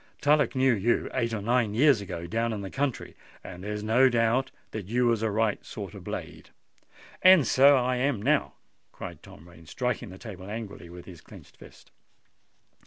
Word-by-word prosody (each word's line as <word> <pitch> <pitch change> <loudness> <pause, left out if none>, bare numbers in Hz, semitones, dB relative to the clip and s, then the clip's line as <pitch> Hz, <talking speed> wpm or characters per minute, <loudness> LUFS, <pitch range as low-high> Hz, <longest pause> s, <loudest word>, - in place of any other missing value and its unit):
Tullock 145 0 +2
knew 130 -1 +3
you 115 +3 0
eight 115 -3 -1
or 110 -3 -4
nine 115 -2 +1
years 135 -2 +4
ago 85 -3 -6
down 115 +5 -1
in 105 - -5
the 95 - -7
country; 135 -2 -3 0.3
and 90 0 -10
there's 105 +1 -4
no 125 +5 +4
doubt 120 +2 +1 0.2
that 105 -4 -6
you 120 +3 +1
was 115 -2 +2
then 110 - +1
a - - -2
right 110 0 0
sort - - -8
of - - -10
blade." - - -7 0.7
"And 185 -6 +7
so 140 +1 +5
I 125 0 0
am 130 -2 0
now!" 140 +7 +1 0.4
cried - - -9
Tom 85 - -15
Rain, 85 -2 -17
striking 125 +4 -3
the 95 - -11
table 100 -4 -10
angrily 105 -5 -7
with 90 0 -11
his 90 -4 -12
clenched - - -15
fist. - - -17
115 Hz, 190 wpm, -27 LUFS, 100-130 Hz, 0.7 s, And